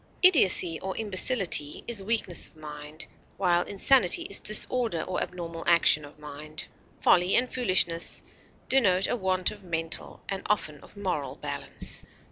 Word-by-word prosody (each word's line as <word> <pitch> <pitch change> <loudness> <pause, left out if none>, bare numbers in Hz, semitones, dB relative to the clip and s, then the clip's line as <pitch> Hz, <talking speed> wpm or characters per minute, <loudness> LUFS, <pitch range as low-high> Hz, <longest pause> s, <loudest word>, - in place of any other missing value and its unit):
Idiocy 190 - +5
or 190 0 -6
imbecility 195 - +2
is 230 -4 -4
weakness 195 -4 0
of - - -22
mind, 150 0 -8 0.3
while 175 -2 +1
insanity 200 0 +3
is 200 - -3
disorder 215 -4 +2
or 185 - -4
abnormal 170 -2 -7
action 170 -3 +3
of 145 - -16
mind. 150 +1 -10 0.3
Folly 180 +1 +2
and 250 +1 +1
foolishness 185 -8 +2 0.4
denote 195 -8 +2
a - - -2
want 185 -4 -1
of 205 - -13
mental 165 -2 -5
and 195 -1 -5
often 155 -8 -2
of - - -18
moral 180 -8 -4
balance. - - -4
180 Hz, 140 wpm, -26 LUFS, 165-205 Hz, 0.4 s, Idiocy